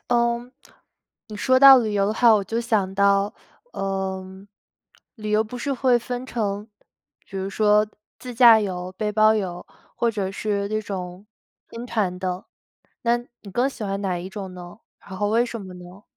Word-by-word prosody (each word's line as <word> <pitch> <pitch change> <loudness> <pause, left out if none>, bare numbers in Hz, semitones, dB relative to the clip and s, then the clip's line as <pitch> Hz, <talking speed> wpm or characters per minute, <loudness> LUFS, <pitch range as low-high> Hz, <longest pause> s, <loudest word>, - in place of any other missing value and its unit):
嗯， 240 0 0 0.7
你 215 -3 -9
说 260 +5 +3
到 270 0 +10
旅 220 -3 -1
游 200 -1 +1
的 210 - 0
话， 235 -1 +5
我 205 -2 +1
就 225 +4 -2
想 215 -5 0
到， 200 +1 +2 0.4
呃， 190 -1 -3 0.9
旅 215 -2 -5
游 215 +1 +3
不 225 +3 -8
是 280 +3 -2
会 255 -2 +3
分 245 +1 -5
成 210 -4 -3 0.6
比 195 - -9
如 190 0 -3
说 210 +1 +3 0.3
自 250 - -8
驾 230 -2 +7
游、 185 -3 -4
背 210 +2 -2
包 215 +1 +4
游， 180 -4 -4 0.3
或 235 - +1
者 200 -4 -3
是 200 0 -2
那 215 +1 -1
种 190 -2 -7 0.4
跟 230 +1 -8
团 215 -7 -1
的。 180 0 -4 0.6
那 235 0 +3 0.3
你 205 - -11
更 245 +7 +1
喜 250 - -8
欢 195 0 -3
哪 185 -3 -1
一 175 +2 -6
种 190 -1 -7
呢？ 180 +3 -11 0.2
然 190 - -10
后 205 +1 0
为 230 +2 +3
什 230 -1 -6
么 185 -2 -10
呢？ 180 +3 -13
210 Hz, 195 characters per minute, -23 LUFS, 190-235 Hz, 0.9 s, 到